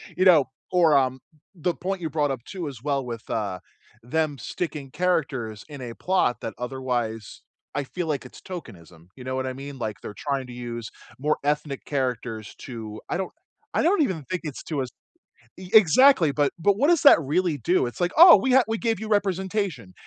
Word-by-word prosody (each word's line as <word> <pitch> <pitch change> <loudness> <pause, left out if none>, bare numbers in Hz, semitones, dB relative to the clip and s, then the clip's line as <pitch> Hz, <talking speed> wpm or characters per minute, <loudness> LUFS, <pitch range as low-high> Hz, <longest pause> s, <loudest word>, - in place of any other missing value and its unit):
You 185 - +2
know? 165 -7 +7 0.3
Or, 165 -5 +5
um, 130 -1 +1 0.3
the 175 -1 -2
point 190 0 -3
you 160 - -2
brought 145 -2 0
up, 130 -4 -5
too, 180 -5 -5
as 130 -5 -8
well 140 -1 -1
with, 115 -2 -7
uh, 100 -5 -2 0.4
them 145 +2 -1
sticking 150 -1 -5
characters 135 -10 -1
in 145 -3 -9
a 120 -2 -6
plot 180 -5 0
that 110 - -5
otherwise 120 -3 -3 0.3
I 145 - 0
feel 175 +5 -5
like 145 -4 -2
it's 125 - -13
tokenism. 90 - -10
You 125 - -11
know 130 +1 -3
what 130 - -2
I 130 - -3
mean? 140 +1 -8
Like, 110 -4 -4
they're 105 - -8
trying 140 -3 -2
to 125 - -9
use 120 -2 -6 0.3
more 150 +3 +1
ethnic 150 -1 -1
characters 125 -6 -3
to 110 -4 -7
I - - -1
don't 190 - -3 0.4
I - - +3
don't 355 0 +3
even 180 - -2
think 185 -1 -2
it's 150 -4 -6
to 145 -4 -2
us 130 - -4 0.7
E 185 0 -10
exactly, 215 - +6
but 145 -1 +1
but 200 +4 +3
what 285 +7 +3
does 345 -3 +4
that 285 - +9
really 160 +2 0
do? 175 +7 +1
It's 120 - -6
like, 175 0 +1
"Oh, 345 +2 +11
we 265 -1 +1
ha 265 0 +6
we 225 0 -1
gave 225 -3 -1
you 220 - -5
representation." 190 - -1
145 Hz, 205 wpm, -25 LUFS, 125-180 Hz, 0.7 s, Oh